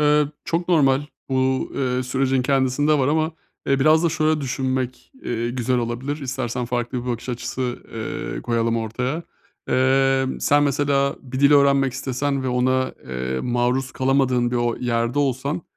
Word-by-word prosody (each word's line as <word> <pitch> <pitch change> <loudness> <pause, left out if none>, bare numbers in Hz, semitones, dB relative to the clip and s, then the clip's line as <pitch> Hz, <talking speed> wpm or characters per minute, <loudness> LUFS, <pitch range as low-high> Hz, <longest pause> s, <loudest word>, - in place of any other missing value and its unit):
Iıı, 150 0 +3
çok 170 +2 -2
normal. 140 -5 +4 0.3
Bu, 130 0 0
ııı, 130 -1 -1
sürecin 130 0 +1
kendisinde 140 +3 +2
var 130 - +2
ama, 155 +2 +1 0.3
eee, 135 0 +2
biraz 155 +4 +5
da - - +4
şöyle 155 -1 +1
düşünmek, 130 -1 -3
ııı, 120 0 -1
güzel 125 0 0
olabilir. 120 +5 -3
İstersen 125 -2 -3
farklı 120 +1 -2
bir 125 - -9
bakış 120 +2 -5
açısı, 125 0 -3
ııı, 110 -1 -4
koyalım 115 -1 0
ortaya. 125 +8 -2 0.5
Emm, 135 0 +2
sen 145 0 +3
mesela 140 0 +1
bir 130 0 -5
dil 140 +1 +6
öğrenmek 140 -2 +4
istesen 135 +1 -2
ve 130 - -2
ona, 130 +1 +1
eee, 65 0 -3
maruz 125 +2 0
kalamadığın 130 -2 +1
bir 125 - -1
o 120 -1 0
yerde 120 +2 -1
olsan, 140 +4 -1
130 Hz, 155 wpm, -22 LUFS, 125-140 Hz, 0.5 s, dil